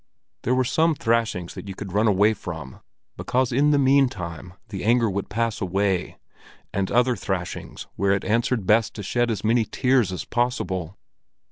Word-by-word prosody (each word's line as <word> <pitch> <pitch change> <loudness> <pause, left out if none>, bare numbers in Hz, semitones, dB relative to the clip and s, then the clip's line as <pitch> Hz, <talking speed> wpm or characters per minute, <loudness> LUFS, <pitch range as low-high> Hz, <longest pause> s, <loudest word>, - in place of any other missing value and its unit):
There 125 - +1
were 130 - +3
some 160 +5 +2
thrashings 115 -9 0
that - - -9
you 95 - -6
could 95 -2 -7
run 105 +2 +3
away 105 +2 +4
from, 80 -9 -8 0.4
because 130 0 0
in 140 +4 +3
the 145 - +4
meantime 115 - +1
the 100 -3 -5
anger 115 +1 +3
would 100 -1 -3
pass 115 +1 -1
away, 95 0 -1 0.6
and 100 -1 -1
other 125 +1 +3
thrashings 95 -5 -5
where 100 +1 +2
it 100 - -1
answered 115 +1 +1
best 110 +3 +3
to 105 - -6
shed 120 +5 0
as 110 -4 -2
many 115 +2 +3
tears 125 -3 +1
as 90 - -5
possible. 100 -7 -2
110 Hz, 170 wpm, -24 LUFS, 95-125 Hz, 0.6 s, away